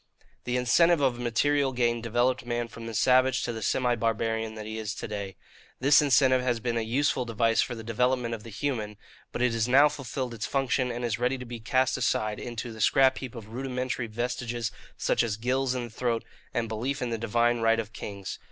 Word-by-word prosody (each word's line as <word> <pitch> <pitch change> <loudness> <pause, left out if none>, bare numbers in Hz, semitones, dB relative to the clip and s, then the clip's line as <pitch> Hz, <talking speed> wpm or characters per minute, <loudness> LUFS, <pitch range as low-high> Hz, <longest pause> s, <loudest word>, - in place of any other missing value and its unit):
"The 125 0 0
incentive 165 +7 +4
of 130 -4 +1
material 135 +3 +1
gain 120 -1 +1
developed 120 +3 +1
man 120 -1 -2
from 115 +1 -9
the 115 - -5
savage 130 +2 +3
to 120 - -2
the 110 - -6
semi 125 +4 +1
barbarian 110 -1 -1
he 110 +1 -5
is 105 -1 -4
to - - -5
day. 100 -3 -5 0.4
This 140 +4 +6
incentive 130 -2 +4
has 120 -2 0
been 120 0 -2
a 115 - +1
useful 130 +3 +1
device 115 -1 +2
for 120 - -2
the 115 - -8
development 120 +1 0
of 115 - -5
the 115 - -10
human; 110 -2 -3 0.3
but 125 - -2
it 125 -2 +2
has 115 0 0
now 140 +4 +6
fulfilled 130 -3 -4
its 110 -2 -4
function 135 -2 0
and 120 +1 -3
is 115 -1 -1
ready 125 +2 +1
to 125 - -8
be 120 -1 -7
cast 130 +3 +1
aside 110 -4 0
into 120 -1 -5
the 110 - -8
scrap 130 +5 +4
heap 130 -3 -7
of 110 -2 -9
rudimentary 125 0 -3
vestiges 120 0 -3 0.3
such - - +1
as 110 -3 -1
gills 130 +2 0
in 125 - -2
the 120 - -7
throat 115 0 -1 0.3
and 120 -2 -1
belief 125 +5 -2
in 120 - -2
the 115 - -2
divine 120 +1 +2
right 115 0 +3
of 110 0 -5
kings. 100 -2 -6
120 Hz, 215 wpm, -28 LUFS, 115-130 Hz, 0.4 s, This